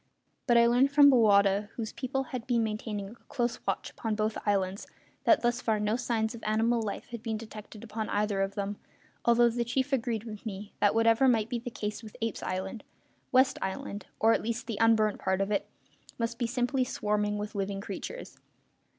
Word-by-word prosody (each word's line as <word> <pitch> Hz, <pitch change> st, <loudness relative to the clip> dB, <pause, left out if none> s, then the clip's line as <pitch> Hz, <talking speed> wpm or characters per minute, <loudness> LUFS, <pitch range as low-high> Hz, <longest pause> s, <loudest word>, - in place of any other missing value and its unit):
But 240 Hz, -2 st, +5 dB
I 235 Hz, -, +7 dB
learned 245 Hz, +4 st, +4 dB
from 285 Hz, 0 st, +8 dB
Bowata, 205 Hz, -4 st, +4 dB
whose 225 Hz, -2 st, -4 dB
people 270 Hz, +1 st, -2 dB
had 250 Hz, -2 st, -4 dB
been 235 Hz, -2 st, +2 dB
maintaining 210 Hz, -2 st, -3 dB
a 225 Hz, -, -12 dB
close 240 Hz, -3 st, -1 dB
watch -, -, -1 dB
upon 220 Hz, -2 st, -3 dB
both 215 Hz, +1 st, 0 dB
islands, 195 Hz, -1 st, 0 dB, 0.4 s
that -, -, +5 dB
thus 240 Hz, +1 st, +1 dB
far 220 Hz, -2 st, +1 dB
no 210 Hz, +1 st, +1 dB
signs 230 Hz, -2 st, -1 dB
of 235 Hz, -, -9 dB
animal 225 Hz, +2 st, +2 dB
life 210 Hz, -2 st, -5 dB
had 235 Hz, -2 st, -6 dB
been 225 Hz, -2 st, -2 dB
detected 215 Hz, -1 st, -10 dB
upon 220 Hz, -1 st, -4 dB
either 205 Hz, -1 st, 0 dB
of 195 Hz, 0 st, -1 dB
them, 200 Hz, 0 st, -3 dB, 0.5 s
although 235 Hz, 0 st, +5 dB
the 240 Hz, +1 st, -1 dB
chief 260 Hz, +4 st, -1 dB
agreed 230 Hz, -4 st, 0 dB
with 215 Hz, -3 st, -8 dB
me 205 Hz, -2 st, -6 dB
that, 205 Hz, -, +3 dB
whatever 230 Hz, +3 st, +4 dB
might 225 Hz, -3 st, +3 dB
be 240 Hz, -, -2 dB
the 245 Hz, +1 st, -6 dB
case 210 Hz, -2 st, -4 dB
with 220 Hz, -2 st, -11 dB
Apes' 225 Hz, -2 st, -2 dB
Island, 190 Hz, +4 st, -4 dB, 0.5 s
West 260 Hz, 0 st, +4 dB
Island 190 Hz, +1 st, -4 dB
or 225 Hz, +1 st, +5 dB
at -, -, +1 dB
least 235 Hz, +2 st, -3 dB
the 225 Hz, -3 st, -4 dB
unburnt 220 Hz, -2 st, +4 dB
part 190 Hz, 0 st, 0 dB
of 195 Hz, +1 st, 0 dB
it 205 Hz, -, 0 dB, 0.5 s
must 230 Hz, 0 st, -2 dB
be 240 Hz, -, +1 dB
simply 250 Hz, +2 st, 0 dB
swarming 210 Hz, -3 st, -1 dB
with 210 Hz, 0 st, -5 dB
living 195 Hz, 0 st, -2 dB
creatures. 205 Hz, -, -7 dB
220 Hz, 200 wpm, -29 LUFS, 210-240 Hz, 0.5 s, from